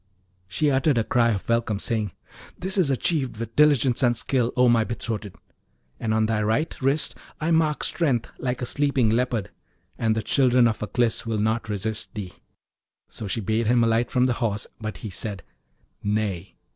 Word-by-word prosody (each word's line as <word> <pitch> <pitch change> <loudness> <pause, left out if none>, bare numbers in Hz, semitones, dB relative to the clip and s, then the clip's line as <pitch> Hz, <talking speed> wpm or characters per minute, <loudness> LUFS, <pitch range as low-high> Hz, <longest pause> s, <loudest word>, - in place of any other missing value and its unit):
She 145 +11 +1
uttered 135 0 +2
a 115 - +3
cry 115 +2 +2
of 100 -4 -2
welcome, 115 -3 +1
saying, 105 -1 -1 0.5
'This 190 +2 -1
is 170 -6 +3
achieved 135 -2 0
with 115 0 -6
diligence 140 -5 +4
and 120 -2 +3
skill, 125 -3 0
O 125 0 +5
my 115 -2 +4
betrothed! 110 -3 -5 0.6
and 110 - -2
on 110 0 +2
thy 110 -1 0
right 110 +10 0
wrist 135 +4 +1 0.3
I 155 +2 -1
mark 160 -2 +2
strength 135 -9 0
like 125 -1 -2
a - - 0
sleeping 135 -4 +1
leopard, 115 -3 0 0.5
and 110 -1 +1
the 110 - -2
children 125 -3 +4
of 110 - -2
Aklis 115 +2 0
will 110 -1 -1
not 110 +2 0
resist 105 +2 -3
thee.' 95 -4 -6 0.8
So 110 - -7
she 115 +4 -2
bade 110 +2 0
him 120 0 +4
alight 115 +1 +2
from 125 -1 +2
the 125 - +2
Horse, 105 -3 0
but 110 -1 -5
he 105 - -5
said, 100 -1 -4 0.6
'Nay.' 100 -3 -2
115 Hz, 180 wpm, -24 LUFS, 110-130 Hz, 0.8 s, O